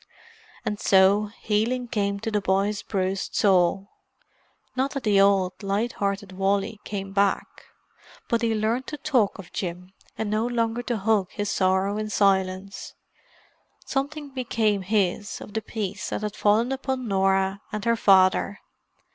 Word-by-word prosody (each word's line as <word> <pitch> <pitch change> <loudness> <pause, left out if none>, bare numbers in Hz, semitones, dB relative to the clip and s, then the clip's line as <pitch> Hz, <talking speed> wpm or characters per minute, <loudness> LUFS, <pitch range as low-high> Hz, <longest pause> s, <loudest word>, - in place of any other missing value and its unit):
And 210 - -2
so, 195 +2 +4
healing 235 +4 0
came 200 -4 -1
to 225 0 -3
the 210 -1 +1
boy's 195 +2 0
bruised 190 -1 -2
soul. 195 0 +2 0.8
Not 265 +2 0
that 275 - -3
the 205 -2 +4
old, 195 -1 +2
light 205 +4 -1
hearted 200 -1 -3
Wally 195 +2 0
came 195 -1 -5
back: 200 -1 0 0.6
but 235 -1 +1
he 225 -1 +1
learned 225 +4 -1
to 300 - -5
talk 255 -8 +1
of 195 -4 -12
Jim, 180 0 -5 0.2
and 220 - -2
no 215 +2 +1
longer 230 -1 -1
to 240 -1 -2
hug 205 -2 +1
his 205 0 -3
sorrow 190 +2 +1
in 215 0 -3
silence. 195 -1 0 0.9
Something 285 +2 -3
became 230 -6 0
his 205 +1 -1
of 205 - -11
the 220 - -1
peace 210 -2 -4
that - - -3
had 210 -1 -3
fallen 220 +5 +2
upon 265 -2 -3
Norah 195 0 +1
and 215 0 -4
her 235 0 +3
father. 195 -1 +4
205 Hz, 150 wpm, -25 LUFS, 195-225 Hz, 0.9 s, so